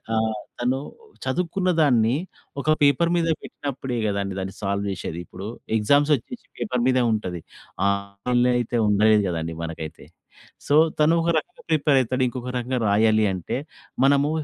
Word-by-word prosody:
ఆహ్, 110 -1 0 0.2
తను 125 +2 +1 0.5
చదువుకున్న 180 +7 -1
దాన్ని 120 -5 +3 0.5
ఒక - - -11 0.2
పేపర్ 145 +4 +4
మీద 165 -1 +1
పెట్టినప్పుడే 135 -3 -5
కదండీ, 100 -1 -2
దాన్ని 95 0 -6
సాల్వ్ 100 0 -1
చేసేది. 85 -2 -5
ఇప్పుడు 95 - -8 0.3
ఎగ్జామ్స్ 145 +8 +3
వచ్చేసి 235 - -9
పేపర్ 125 - -1
మీదే 130 -1 +3
ఉంటది. 90 -5 -3 0.5
ఆన్‌లైన్‌లో 100 +5 0
అయితే 120 0 -1
ఉండదు 105 +1 +4
కదండీ 80 -2 -3
మనకైతే. 80 -1 -7 0.6
సో, - - 0 0.3
తను 155 +2 +5
ఒక 165 - 0
రకంగా 155 - -5
ప్రిపేర్ 150 -3 +3
అవుతాడు. 130 +1 0
ఇంకొక 125 0 -5
రకంగా 125 +1 -1
రాయాలి 110 +1 +4
అంటే 90 -3 -4 0.5
మనము 140 +1 +4
120 Hz, 140 wpm, -24 LUFS, 100-140 Hz, 0.6 s, తను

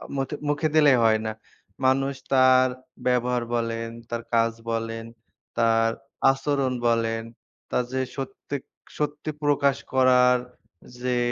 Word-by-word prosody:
মুথে, 135 +2 -2
মুখে 150 +2 +1
দিলেই 145 -4 +6
হয় 110 -1 +4
না। 110 - -1 0.5
মানুষ 135 +1 +2 0.2
তার 130 -1 +6 0.4
ব্যবহার 125 -1 +1
বলেন, 115 -1 -2 0.2
তার 115 0 -3
কাজ 115 0 +3 0.2
বলেন, 115 0 -3 0.5
তার 115 -1 +3 0.4
আচরণ 135 -1 -1
বলেন, 115 -1 +1 0.5
তার 125 - +1
যে, 130 - 0 0.2
সত্যি, 135 +1 -5 0.4
সত্যি 150 +1 -2
প্রকাশ 140 -1 +2 0.2
করার 125 -1 +5 0.6
যে, 125 -1 0
125 Hz, 115 wpm, -25 LUFS, 115-135 Hz, 0.6 s, দিলেই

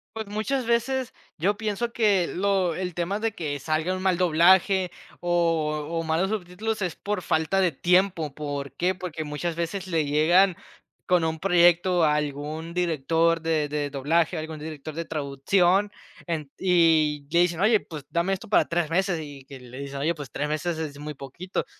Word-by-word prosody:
Pues, 220 -1 -5
muchas 225 +5 -2
veces 250 +2 0 0.3
yo 200 +5 +1
pienso 220 +2 -2
que 205 -7 +2
lo 190 -3 0
el 180 -1 -3
tema 175 +5 -2
de 225 0 0
que 150 -6 -4
salga 160 +5 -1
un 185 - -5
mal 185 -2 +2
doblaje, 180 +2 +4 0.3
o 165 -4 0
o 165 0 -2
malos 165 +4 0
subtítulos 210 +1 -3
es 175 - -2
por 205 -3 -3
falta 160 +5 +1
de 180 -3 +3
tiempo, 175 0 +2
¿por 145 -2 -5
qué?, 180 +2 +1
porque 175 -4 -5
muchas 155 +3 -3
veces 170 +3 -3
le 165 -4 0
llegan 170 +6 +4 0.5
con 180 -2 +3
un 160 0 -2
proyecto 175 0 +4
a 150 -1 +4
algún 150 +3 -3
director 165 0 +1
de 160 -2 0
de 145 -1 -2
doblaje, 160 +5 +1
algún 155 -1 -5
director 155 0 -7
de 165 +2 -4
traducción, 175 +7 +1 0.4
en 155 -5 -3
y, 160 -5 +3
le 170 - +3
dicen: 175 -1 +2
"Oye, 215 +1 +5
pues, 150 -7 -9
dame 170 +4 +1
esto 190 - -5
para 210 - +4
3 165 -2 0
meses", 180 -1 +1
y 145 -3 -9
que 135 -1 -11
le 125 +1 -11
dicen: 140 0 -6
"Oye, 155 +5 0
pues 145 -5 -8
3 150 - -2
meses 155 +2 -2
es 150 -3 -5
muy 150 0 -6
poquito". 140 +8 -5
170 Hz, 180 wpm, -25 LUFS, 150-185 Hz, 0.5 s, Oye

